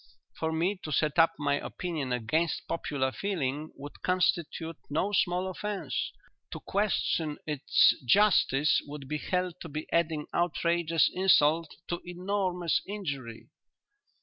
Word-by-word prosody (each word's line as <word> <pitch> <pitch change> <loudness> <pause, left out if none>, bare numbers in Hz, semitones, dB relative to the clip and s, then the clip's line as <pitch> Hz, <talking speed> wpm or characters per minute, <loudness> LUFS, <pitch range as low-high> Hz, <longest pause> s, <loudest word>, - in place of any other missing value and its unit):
For 160 0 -2
me 175 +5 0
to 155 - -6
set 150 +2 +1
up 165 0 +6
my 145 -1 0
opinion 160 -8 -4
against 155 +8 0
popular 140 -5 -1
feeling 155 -5 -2
would 145 +1 -10
constitute 170 -3 0
no 160 +8 0
small 180 0 +1
offence; 205 +2 -3 0.4
to - - -5
question 175 -6 0
its 150 -3 +4
justice 155 - +4
would 145 -2 -8
be 150 +2 -2
held 180 0 -2
to 165 - -7
be 155 +1 -5
adding 160 -3 +1
outrageous 170 -1 +2
insult 165 -4 +3
to 175 - -2
enormous 180 -1 -1
injury." 140 - -5
165 Hz, 125 wpm, -29 LUFS, 150-180 Hz, 0.4 s, up